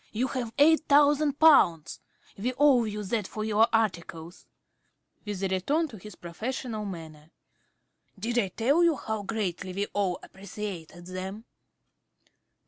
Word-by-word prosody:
You 250 +4 -1
have 245 -4 -3
eight 315 +2 +5
thousand 290 0 +4
pounds! 270 - +4 0.4
We 245 +6 -2
owe 270 -4 +5
you 210 -1 -4
that 205 0 -2
for 215 0 -5
your 220 +1 +4
articles. 175 -6 -2 0.8
(With 200 -2 -4
a - - +2
return 280 - 0
to 220 - -10
his 210 +3 -11
professional 220 +5 -5
manner.) 160 -5 -9 0.9
Did 235 +5 -1
I 200 - +1
tell 260 - +2
you 335 -2 +4
how 220 -5 -4
greatly 190 -3 -3
we 200 +2 -1
all 195 -3 0
appreciated 190 -3 -8
them? 190 +4 -6
210 Hz, 135 wpm, -27 LUFS, 185-255 Hz, 0.9 s, eight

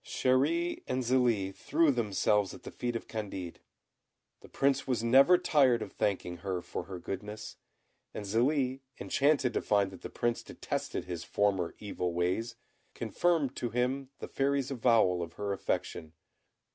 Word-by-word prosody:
Chéri 150 +7 +1
and 130 0 -1
Zélie 120 -6 +2
threw 150 +10 +2
themselves 105 -4 +1
at - - -14
the - - -8
feet 120 -1 -3
of 115 - -4
Candid. 95 -6 -5 0.8
The - - -15
Prince 140 0 +1
was 120 -4 0
never 135 +9 +6
tired 130 -9 +3
of 100 - -9
thanking 90 -3 -1
her 90 0 -3
for - - -5
her 95 -2 -7
goodness, 105 +4 -6 0.5
and 105 - -6
Zélie, 130 +5 +1 0.2
enchanted 140 -3 +2
to - - 0
find 100 -2 +2
that 95 - -12
the - - -6
Prince 120 0 -1
detested - - -4
his 85 -2 -5
former 95 -4 0
evil 90 -4 -3
ways, 95 +7 -1 0.4
confirmed 140 +4 0
to 120 - -2
him 130 +3 -1
the - - -7
Fairy's 140 -1 0
avowal 115 -8 +3
of 85 -1 -5
her 100 +1 -3
affection. 80 -4 -3
115 Hz, 155 wpm, -31 LUFS, 95-130 Hz, 0.8 s, never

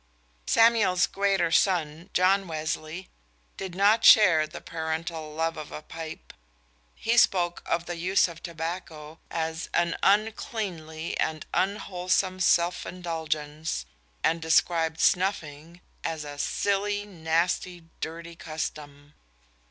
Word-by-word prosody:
_ - - -4
Samuel's 220 -6 +4
greater 195 -4 +1
son, 165 -1 +1
John 190 +2 +3
Wesley, 155 +2 -4 0.5
did 190 -2 -6
not 205 +4 +4
share 165 -8 +7
the - - -9
parental 160 -1 -4
love 165 0 -1
of 155 -1 -7
a 150 - -7
pipe. 160 0 -9 0.6
He 235 +1 0
spoke 175 -4 +2
of 170 0 0
the 175 -1 -5
use 185 +4 +3
of 170 -1 -10
tobacco 165 -2 -6
as 160 0 -3
"an 170 -1 +2
uncleanly 195 - -1
and 155 0 -1
unwholesome 185 -1 0
self 175 -1 +2
indulgence," 160 - -3 0.4
and 165 +1 +2
described 160 0 +2
snuffing 170 -3 0 0.2
as 160 -2 -3
"a 145 -1 -8
silly, 205 +3 0
nasty, 170 0 -1 0.2
dirty 165 +1 -6
custom." 150 -2 -6
170 Hz, 115 wpm, -27 LUFS, 160-185 Hz, 0.6 s, share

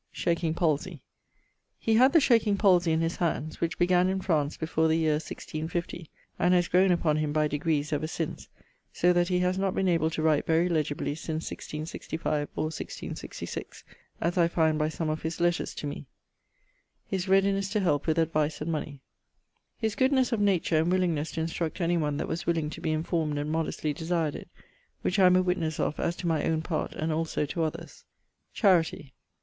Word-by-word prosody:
Shaking 170 -2 -1
palsey. 165 -1 -1 0.7
He 225 - 0
had 255 +5 +6
the 330 - +6
shaking 230 -7 +3
palsey 180 -5 +4
in 160 0 +2
his 165 +1 -1
handes; 160 -3 -2
which 170 0 -1
began 180 +1 +3
in 190 0 0
France 160 -6 0
before 160 0 +1
the 160 - +2
yeare 155 -2 +2
1650, 165 +1 -5 0.3
and 180 +1 +4
haz 175 -1 +2
growne 185 +1 +4
upon 160 -3 +2
him 155 -1 -1
by 155 0 +2
degrees, 150 0 -1
ever 150 +2 -1
since, 160 0 -5 0.4
so 180 +1 +3
that 175 0 +2
he 180 0 +1
haz 180 +1 +1
not 195 -1 0
been 190 - +1
able 165 -3 +2
to 160 -1 -3
write 155 -2 +2
very 165 +2 +3
legibly 150 -3 -1
since 160 +1 -4
1665 155 -1 -4
or 155 +1 -2
1666, - - -7 0.4
as 175 +2 0
I 170 - +5
find 160 -2 +1
by 155 0 +1
some 160 0 -3
of 155 0 -2
his 160 +1 -4
letters 175 0 0
to - - -5
me. 145 0 -6 1.1
<_His 190 0 -1
readiness 195 0 +3
to 210 +1 0
help 150 -7 +1
with 160 0 +1
advice 155 -2 +1
and 155 +2 -3
money._> 150 -3 -4 0.8
His 220 -2 -1
goodnes 260 -1 +2
of 225 - 0
nature 190 -5 +2
and 165 +3 +1
willingnes 170 -5 0
to 160 - -2
instruct 165 +2 -3
any 175 0 +1
one 150 -3 -1
that - - -3
was 165 +2 -4
willing 160 -3 0
to - - -8
be 160 - -1
informed 155 -1 -1
and 145 +1 -2
modestly 155 -1 -1
desired 160 -1 -1
it, - - -9 0.5
which 195 - 0
I 185 - +7
am 180 - +5
a 185 - +4
witnesse 170 -4 -1
of 155 - -1
as 170 - 0
to 180 - -4
my 160 -3 +1
owne 160 -1 0
part 160 -2 -2
and 155 0 -2
also 160 -1 -1
to 165 +4 -3
others. 165 +1 -4 0.5
_Charity. 165 - +2
165 Hz, 195 wpm, -28 LUFS, 155-180 Hz, 1.1 s, I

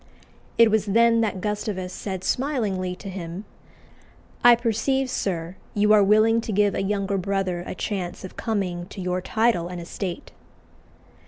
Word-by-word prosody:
It 230 -2 +6
was 220 -1 +1
then 230 +2 +4
that 205 -4 -1
Gustavus 205 -3 -3
said 190 -2 -5
smilingly 210 -11 -1
to 195 - -11
him, 185 +1 -6 1.0
"I 240 0 +9
perceive, 250 +3 0
sir, 175 -2 -3 0.2
you 210 +1 +4
are 210 -1 +6
willing 215 +3 +4
to 225 - -5
give 205 0 +2
a - - -1
younger 200 0 -1
brother 185 -2 -1
a - - -5
chance 185 -5 -4
of 185 - -9
coming 185 -6 -2
to 200 - -10
your 180 0 -1
title 220 -4 +1
and 180 0 -6
estate." 175 +1 -6
200 Hz, 155 wpm, -24 LUFS, 185-220 Hz, 1.0 s, I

